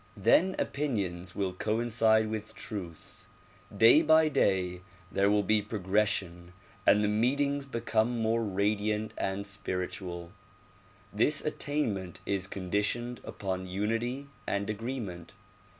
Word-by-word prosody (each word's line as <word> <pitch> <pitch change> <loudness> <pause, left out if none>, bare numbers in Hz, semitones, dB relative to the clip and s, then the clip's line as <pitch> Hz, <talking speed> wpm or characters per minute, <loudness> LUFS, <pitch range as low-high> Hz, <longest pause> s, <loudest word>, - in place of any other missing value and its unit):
Then 185 - +4
opinions 95 -11 -2
will 95 -2 -1
coincide 110 +2 +2
with 110 +1 -5
truth; 95 -8 -8 0.5
day 115 +8 +7
by 160 0 +5
day 90 -8 +1 0.3
there 100 +1 +3
will 105 0 +3
be 105 +2 +2
progression 95 -4 -1 0.3
and 105 - +6
the - - +2
meetings 140 +6 +1
become 115 -1 0
more 115 +1 +1
radiant 105 +1 0
and 95 +1 -2
spiritual. 90 -3 -4 0.8
This 130 +8 +2
attainment 115 - -2
is 95 -2 -1
conditioned 105 +6 -2
upon 95 -1 -4
unity 115 +8 -2 0.2
and 100 +1 -1
agreement. 105 -7 -5
105 Hz, 110 wpm, -30 LUFS, 95-115 Hz, 0.8 s, day